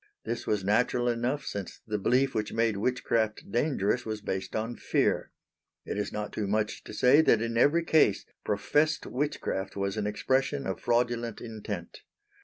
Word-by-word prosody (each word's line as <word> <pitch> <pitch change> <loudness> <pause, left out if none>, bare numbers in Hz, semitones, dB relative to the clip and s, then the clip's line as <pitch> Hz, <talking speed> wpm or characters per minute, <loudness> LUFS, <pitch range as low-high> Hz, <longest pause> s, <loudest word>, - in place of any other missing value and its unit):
This 120 - -4
was 105 -2 +1
natural 120 +4 +2
enough 120 +4 0
since 100 -2 -5
the 105 -1 -2
belief 130 +6 +2
which 105 -1 -2
made 115 -1 +1
witchcraft 110 -1 -1
dangerous 120 -3 +1
was 110 -1 -4
based 95 -2 -4
on 115 +2 -2
fear. - - 0 0.6
It - - -3
is 105 0 -2
not 105 0 -4
too 105 - -2
much 105 +1 -1
to - - -8
say 135 +5 +6
that 115 -8 +4
in 115 +1 -2
every 145 +8 +4
case, 155 -11 +3 0.2
professed 150 +9 +1
witchcraft 125 -7 -2
was 100 +1 -2
an 105 -1 -1
expression 135 +6 0
of - - -3
fraudulent 120 -1 0
intent. 105 -6 -6
115 Hz, 165 wpm, -29 LUFS, 105-125 Hz, 0.6 s, say